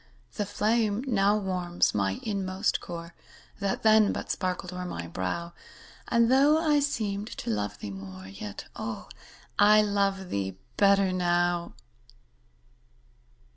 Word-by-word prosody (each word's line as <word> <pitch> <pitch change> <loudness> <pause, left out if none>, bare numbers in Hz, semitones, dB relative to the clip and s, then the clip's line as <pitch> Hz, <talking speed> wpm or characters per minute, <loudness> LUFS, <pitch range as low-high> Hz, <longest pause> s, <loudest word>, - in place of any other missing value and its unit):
The 205 -2 -2
flame 215 +2 +1
now 205 -4 +3
warms 180 -3 0
my 95 -2 0
inmost 195 -1 -1
core, 170 -1 -7 0.5
That 200 -1 -2
then 220 -1 +6
but - - -4
sparkled 180 -1 -3
o'er 180 0 -4
my 85 - -5
brow, 95 - -4 0.5
And, 235 0 +3
though 280 +4 +5
I 310 -2 +3
seemed 215 -8 -1
to - - -3
love 105 -1 -2
thee 100 - -6
more, 95 -1 -9
Yet, 100 +1 -8
oh, - - -5 0.5
I 210 +1 +7
love 200 -2 0
thee 95 -1 -2 0.2
better 200 -2 +4
now. 175 -1 +1
190 Hz, 130 wpm, -28 LUFS, 170-210 Hz, 0.5 s, I